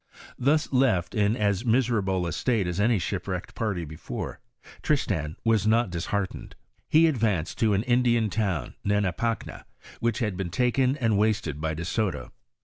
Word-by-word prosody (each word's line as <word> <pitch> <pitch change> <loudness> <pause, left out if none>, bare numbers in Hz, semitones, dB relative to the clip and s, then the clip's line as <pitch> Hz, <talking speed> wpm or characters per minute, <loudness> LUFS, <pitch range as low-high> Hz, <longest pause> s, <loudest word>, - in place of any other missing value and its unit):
Thus 145 +3 +2
left 125 -10 +2
in 105 +2 +2
as 100 -1 +1
miserable 110 -7 +1
a 85 - -2
state 115 -2 0
as 90 +2 -3
any 110 +2 +3
shipwrecked 90 0 -4
party 100 -7 -2
before, 75 +1 -6 0.4
Tristan 75 0 0
was 110 -2 +3
not 115 -2 +3
disheartened; 95 +3 -3 0.3
he 160 +2 +6
advanced 110 - 0
to 110 -3 +3
an 100 - 0
Indian 120 -3 +2
town 100 -8 -1
Hanipacna, 105 +3 -1 0.4
which 115 -2 0
had 105 -6 -1
been 95 -1 -3
taken 125 - +1
and 115 -7 +1
wasted 105 -9 0
by 80 0 -1
De 85 +2 -5
Soto. 90 - -2
105 Hz, 150 wpm, -26 LUFS, 90-115 Hz, 0.4 s, he